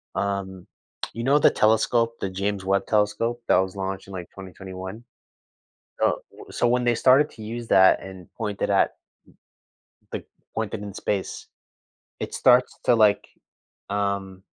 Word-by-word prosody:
Um, 95 -2 -3 0.5
you 115 - -5
know 140 +3 +4
the - - +6
telescope, 115 +2 +2
the 95 - -2
James 100 +1 -3
Webb 100 +1 +1
Telescope 115 +3 +1
that - - +5
was 95 0 0
launched 95 0 -4
in, 100 - -10
like, 90 -2 -7
2021? 95 +3 -9 1.0
Oh, - - +2
w - - -13
so 120 - +1
when 125 +1 +2
they 120 -1 +2
started 135 +5 +5
to 110 - -11
use 115 +1 -6
that 95 0 +5
and 95 -2 -10
pointed 105 -3 -2
at - - +2 1.2
the - - -4 0.3
pointed - - -3
in 100 -2 -7
space, 100 -2 -3 0.7
it's - - -4
starts 125 0 +4
to, 120 - +5
like, 105 -2 +4 0.6
um 100 -2 -2
100 Hz, 150 wpm, -24 LUFS, 95-115 Hz, 1.2 s, the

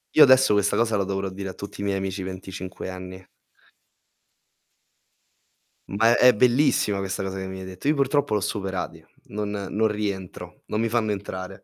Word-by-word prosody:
Io - - +7
adesso 130 -4 +6
questa 100 0 +2
cosa 115 -1 +2
la 100 -1 +1
dovrò 95 0 -2
dire 95 +1 -6
a - - -6
tutti 100 0 -8
i - - -2
miei 100 -1 0
amici 95 0 -3
25 95 0 -7
enni. 95 0 -8 2.6
Ma 115 +4 +3
è 125 0 +7
bellissima 120 -3 +3
questa 95 0 -3
cosa 95 0 -4
che 95 0 -4
mi 95 0 -7
hai 95 - -7
detto. 95 +7 -7
Io 155 - +3
purtroppo 140 -3 +1
li 105 - +3
ho - - -8
superati, 95 -2 -4 0.2
non 105 0 -4 0.2
non 110 +2 +2
rientro 100 -3 -5
non 105 - -2
mi 115 - +1
fanno 110 -2 +1
entrare. 95 -1 -6
100 Hz, 180 wpm, -24 LUFS, 95-110 Hz, 2.6 s, Io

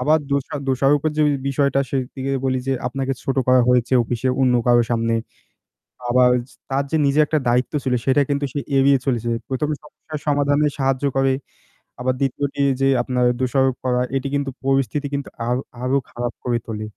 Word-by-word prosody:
আবার 155 +5 +3
দোষা 140 0 -1
দোষারোপের 140 +3 +2
যে - - +4 0.3
বিষয়টা 140 0 +1
সেদিকে 135 0 -3
বলি 130 -1 +1
যে 135 - +1
আপনাকে 135 +1 -2
ছোট 135 - -2
করা 130 0 +6
হয়েছে 125 0 +2
অফিসে 120 +2 -2
অন্য 130 -2 +3
কারো 120 -1 +5
সামনে। 115 -1 +1 1.0
আবার 125 +1 +5 0.4
তার 135 +1 +1
যে - - +1
নিজের 140 +2 +4
একটা 155 - +1
দায়িত্ব 125 +1 +1
ছিল 130 -2 +1
সেটা 135 +2 +3
কিন্তু 140 0 0
সে 145 - -3 0.2
এড়িয়ে 135 0 +5
চলেছে। 120 -3 0 0.2
১ম 135 +3 -1
এ - - -8
সমস্যার 155 +1 -9
সমাধানে 145 +1 +2
সাহায্য 135 0 0
করে। 135 0 +3 0.7
আবার 130 +1 0
২য় 140 +1 0
টি 145 - -10 0.2
যে 135 - +4
আপনার 125 0 0
দোষারোপ 130 0 +1
করা 125 0 +1
এটি 135 +1 -1
কিন্তু 140 -1 -1 0.2
পরিস্থিতি 135 +1 +1
কিন্তু 140 -1 -3 0.2
আর 120 - +1 0.3
আরো 130 +2 +1
খারাপ 120 0 -4
করে 120 -1 0
তোলে। 110 -1 -4
135 Hz, 175 wpm, -21 LUFS, 125-140 Hz, 1.0 s, করা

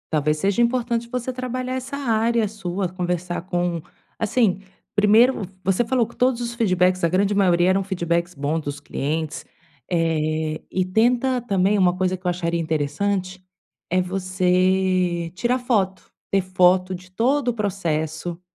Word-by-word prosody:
Talvez 150 0 +1
seja 200 +6 +1
importante 235 -1 0
você 250 +1 -3
trabalhar 255 0 -4
essa 260 +2 -5
área 230 -4 +1
sua, 195 -3 -3
conversar 180 -1 -3
com 175 -2 -1 0.4
assim, 215 -3 +2 0.3
primeiro 215 +4 +4 0.2
você 195 +6 +2
falou 245 0 +2
que 235 - -16
todos 250 -1 +2
os 235 0 -3
feedbacks, 185 -5 +2
a - - +4
grande 195 +4 +1
maioria 180 -3 +3
eram 190 +1 +3
feedbacks 175 -2 -1
bons 145 +3 -1
dos 145 -1 -6
clientes, 150 +2 -3 0.4
eh, 155 -2 0
e 185 - 0
tenta 240 +7 +2
também 200 -3 +1
uma 180 -2 +3
coisa 185 0 0
que 180 0 -7
eu - - +4
acharia 170 -1 -1
interessante, 180 +5 -1 0.5
é 185 +1 +2
você 185 -1 +1
tirar 240 +7 0
foto. 200 -7 0 0.3
Ter 195 - +2
foto 185 0 +3
de 185 +1 -12
todo 250 +6 +1
o - - 0
processo. 170 -5 -2
185 Hz, 150 wpm, -22 LUFS, 175-225 Hz, 0.5 s, primeiro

